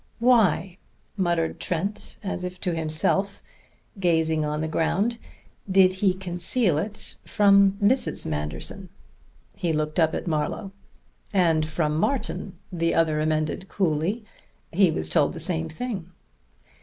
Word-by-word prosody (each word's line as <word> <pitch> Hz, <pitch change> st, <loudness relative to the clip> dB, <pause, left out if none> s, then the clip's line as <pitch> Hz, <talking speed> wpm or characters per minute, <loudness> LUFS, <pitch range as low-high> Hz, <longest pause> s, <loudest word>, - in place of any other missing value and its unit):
"Why," 220 Hz, -6 st, +3 dB, 0.4 s
muttered 170 Hz, -4 st, 0 dB
Trent 190 Hz, +5 st, -3 dB
as 190 Hz, -2 st, -3 dB
if 180 Hz, 0 st, -5 dB
to 180 Hz, -3 st, -1 dB
himself, 165 Hz, +5 st, 0 dB, 0.6 s
gazing 160 Hz, -3 st, +2 dB
on 150 Hz, 0 st, -2 dB
the 160 Hz, -, -1 dB
ground, 200 Hz, +9 st, 0 dB, 0.5 s
"did 185 Hz, -1 st, +5 dB
he 190 Hz, -3 st, +3 dB
conceal 180 Hz, -, 0 dB
it 210 Hz, +4 st, -6 dB
from 200 Hz, -2 st, +5 dB
Mrs. 240 Hz, +6 st, +2 dB
Manderson?" 75 Hz, -1 st, -3 dB, 0.7 s
He 170 Hz, -, -1 dB
looked 155 Hz, +1 st, -1 dB
up 160 Hz, -1 st, +3 dB
at -, -, -4 dB
Marlowe. 170 Hz, +4 st, -2 dB, 0.6 s
"And 165 Hz, -4 st, +3 dB
from 155 Hz, -1 st, -1 dB
Martin," 205 Hz, -6 st, -2 dB
the 165 Hz, -2 st, 0 dB
other 160 Hz, -2 st, +2 dB
amended 155 Hz, +4 st, -1 dB
coolly. 190 Hz, +5 st, -1 dB, 0.5 s
"He 185 Hz, +1 st, +4 dB
was 80 Hz, -, -1 dB
told -, -, +2 dB
the -, -, -6 dB
same 80 Hz, 0 st, -1 dB
thing." 195 Hz, -3 st, -5 dB
175 Hz, 130 wpm, -25 LUFS, 155-195 Hz, 0.7 s, did